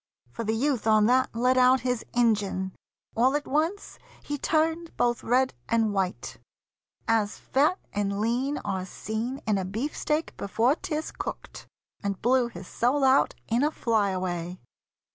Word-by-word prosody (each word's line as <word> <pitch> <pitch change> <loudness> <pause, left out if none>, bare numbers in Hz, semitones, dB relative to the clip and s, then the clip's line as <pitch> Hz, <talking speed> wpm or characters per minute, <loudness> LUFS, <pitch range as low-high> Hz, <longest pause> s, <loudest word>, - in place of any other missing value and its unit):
For 230 - -5
the 220 0 0
youth 255 -2 0
On 215 -1 +5
that 255 +3 +3
let 250 +2 +3
out 255 0 +5
his 250 -2 -1
Injun. 205 -5 +1 0.4
All 255 +4 +3
at 295 - -1
once 320 +8 -1 0.2
He 290 - -3
turned 325 +2 0
both 240 -1 +1
red 255 +3 +2 0.2
and 225 -2 +2
white, 190 -2 -2 0.7
as 220 -2 +1
fat 295 +7 +1 0.2
and 200 -1 -1
lean 250 +6 0
Are 190 -2 -2
seen 225 +7 -4
in 210 -3 +1
a - - -2
beefsteak 290 - -2
before 225 +6 +2
'tis 315 -1 -4
cooked, - - -7 0.3
And 200 -2 -2
blew 250 +1 +3
his 180 -5 -10
soul 265 +4 +1
out 265 +1 +4
in 235 +4 +1
a 300 - +3
fly 220 -8 +1
away. 180 -1 -3
235 Hz, 155 wpm, -27 LUFS, 205-270 Hz, 0.7 s, On